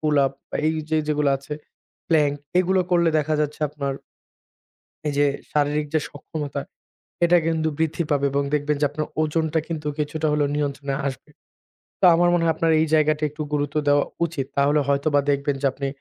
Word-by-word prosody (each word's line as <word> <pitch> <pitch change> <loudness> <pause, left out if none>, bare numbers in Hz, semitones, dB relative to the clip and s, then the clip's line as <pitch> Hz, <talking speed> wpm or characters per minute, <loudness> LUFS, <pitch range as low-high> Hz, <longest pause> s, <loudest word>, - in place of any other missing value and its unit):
Pull 150 -1 +1
up 135 - -3 0.2
বা - - -2
এই 160 - +2 0.2
যে, 160 - +2
যেগুলো 150 -1 +2
আছে 140 +2 -7 0.5
প্ল্যাংক 150 -3 +3 0.2
এগুলো 185 +1 +3
করলে 170 -1 +4
দেখা 155 +1 0
যাচ্ছে 150 0 -2
আপনার 140 -2 -3 1.2
এই 145 - -1
যে 145 - +4 0.3
শারীরিক 150 0 +1
যে 155 - +3
সক্ষমতা 145 -1 -5 0.6
এটা 175 +1 +5
কিন্তু 160 -1 +1
বৃদ্ধি 160 +1 0
পাবে 140 -1 +2
এবং 140 0 +1
দেখবেন 150 0 0
যে - - +3
আপনার 150 +1 -3 0.2
ওজনটা 160 +1 0
কিন্তু 155 -2 -4
কিছুটা 155 +1 -1
হলেও 150 -1 +2
নিয়ন্ত্রণে 140 -1 -2
আসবে। 135 +2 -5 0.7
তো - - +2
আমার 175 +1 +4
মনে 175 -1 +2
হয় 165 -1 +2
আপনার 165 - +1
এই 160 - +2
জায়গাটা 155 0 +2
একটু 150 +1 -6
গুরুত্ব 145 0 -1
দেওয়া 145 0 +4 0.2
উচিত। 150 -5 -3
তাহলে 145 +2 +3
হয়তোবা 140 +1 +2
দেখবেন 140 0 0
যে - - +3
আপনি 140 +1 -4
150 Hz, 180 wpm, -23 LUFS, 145-160 Hz, 1.2 s, এটা